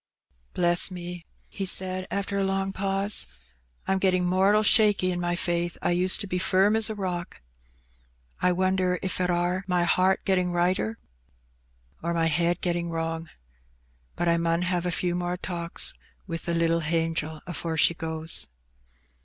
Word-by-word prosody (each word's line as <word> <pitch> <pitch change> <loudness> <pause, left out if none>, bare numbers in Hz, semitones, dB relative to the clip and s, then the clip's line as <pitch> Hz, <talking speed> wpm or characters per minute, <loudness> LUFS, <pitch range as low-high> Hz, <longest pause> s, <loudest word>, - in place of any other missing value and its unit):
"Bless 175 +1 +3
me!'' 175 -1 -7 0.2
he 195 -2 -5
said 185 0 +1
after 200 0 -2
a 200 - +1
long 195 0 -1
pause, 195 +1 +1 0.6
"I'm 190 0 +1
getting 185 -1 +2
mortal 195 +4 +3
shaky 205 -4 +4
in 175 - -3
my 175 0 -1
faith; 175 -1 -1
I - - 0
used 180 +3 +2
to 200 - -4
be 180 -1 -2
firm 190 +3 +3
as 220 -1 +4
a 220 - -4
rock. 180 - -4 1.0
I 180 - +3
wonder 185 0 +1
if 185 -1 -1
it 180 - +1
are 175 +2 0
my 180 -1 +1
heart 185 +2 +2
getting 180 -2 +1
righter, 175 -11 0 1.0
or 170 +1 -2
my 165 -1 +2
head 170 +2 +1
get 175 - +1
ting 170 0 -3
wrong. 165 0 -3 0.9
But 175 - -1
I 170 0 +3
mun 170 +1 0
have 180 -1 -1
a - - -1
few 175 0 -1
more 175 0 -2
talks 170 -2 -1 0.3
wi' 165 -3 -4
the 170 0 -3
little 165 0 +2
hangel 160 -1 -1
afore 165 -2 -4
she 170 - +5
goes." 160 - 0
180 Hz, 165 wpm, -26 LUFS, 170-190 Hz, 1.0 s, she